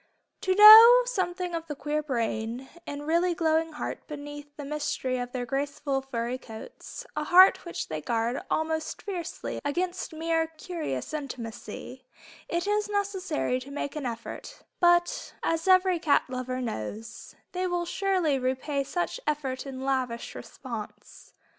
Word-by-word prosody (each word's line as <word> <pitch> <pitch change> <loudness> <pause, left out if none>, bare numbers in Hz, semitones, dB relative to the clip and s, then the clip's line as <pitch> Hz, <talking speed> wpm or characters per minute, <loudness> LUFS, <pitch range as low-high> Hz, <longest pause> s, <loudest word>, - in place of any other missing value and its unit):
To 375 - +1
know 445 +4 +11
something 365 -6 -2
of 330 0 -4
the 295 - -5
queer 295 +2 -2
brain 235 -2 -3 0.2
and 290 0 -5
really 340 +2 +2
glowing 325 -1 +1
heart 300 - -5
beneath 290 -1 -8
the 290 - -6
mystery 275 -3 -2
of 245 0 -4
their 245 -1 -3
graceful 280 +1 -2
furry 250 -1 -3
coats, 255 - -10
a 300 0 -2
heart 370 +4 +7
which 345 - -4
they 155 -1 -4
guard 230 - -1
almost 315 0 -2
fiercely 360 -4 -5
against 355 +6 -2
mere 325 0 0
"curious" 310 - -4
intimacy, 255 -2 -7 0.5
it 340 +2 -1
is 420 0 0
necessary 385 -10 -1
to 260 +2 -11
make 285 +1 -4
an 290 -4 -3
effort; 230 -1 -7 0.2
but 345 0 +2
as 330 +2 0
every 370 -1 +5
cat 315 -4 +3
lover 255 0 -4
knows, 225 - -6 0.2
they 365 0 -1
will 350 -1 -1
surely 360 -6 +1
repay 260 +3 -1
such 350 - -3
effort 275 -3 -2
in 260 -1 -6
lavish 255 -3 -2
response. 230 -5 -9
300 Hz, 145 wpm, -27 LUFS, 255-350 Hz, 0.5 s, know